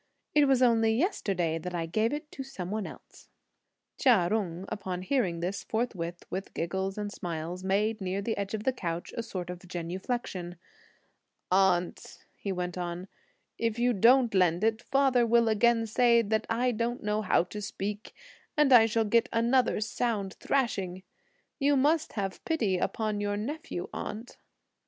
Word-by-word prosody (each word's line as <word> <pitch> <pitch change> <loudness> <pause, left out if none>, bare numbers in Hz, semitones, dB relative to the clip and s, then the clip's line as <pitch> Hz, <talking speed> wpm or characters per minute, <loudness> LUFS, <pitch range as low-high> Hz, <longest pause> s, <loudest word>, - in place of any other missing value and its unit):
"It 295 -1 +5
was 265 -2 +4
only 225 -2 +4
yesterday 195 - 0
that 180 +2 -5
I 165 -1 -1
gave 215 +7 0
it 300 +1 -5
to - - -7
some 195 -9 -6
one." 215 -1 -2 1.1
Chia 210 -10 +4
Jung, 190 -4 -1
upon 185 -4 -4
hearing 185 -8 0
this, 185 +3 -3
forthwith, 180 -7 -3
with 190 +2 -5
giggles 190 +4 -2
and 205 -1 -3
smiles, 170 0 -5
made, 210 +3 +1
near 190 +1 -2
the 220 +3 -2
edge 200 +1 -3
of 210 - -5
the 260 - +1
couch, 170 -7 -4
a - - -1
sort 185 -6 -5
of 180 - -7
genuflexion. 180 +1 -4 1.0
"Aunt," 185 -2 +1
he 200 - -4
went 180 -1 -3
on, 175 +1 -4 0.5
"if 230 -1 0
you 245 +1 +2
don't 235 +3 +5
lend 180 -1 +3
it, 225 +1 +2
father 270 -3 +3
will 235 0 +4
again 225 +1 +3
say 235 +1 +4
that 220 +1 -1
I 245 +2 +1
don't 235 +1 -2
know 210 0 0
how 185 -4 +3
to 210 +4 -7
speak, 205 +1 -5 0.4
and 295 -3 +5
I 225 -2 +8
shall 225 0 +1
get 230 +2 +3
another 235 +2 +2
sound 210 -3 -1
thrashing. 195 -9 -1 0.6
You 285 0 +3
must 305 +4 +2
have 195 -3 -4
pity 220 - 0
upon 215 0 -1
your 205 0 -1
nephew, 280 - -4
aunt." 220 +4 -6
210 Hz, 160 wpm, -29 LUFS, 185-235 Hz, 1.1 s, I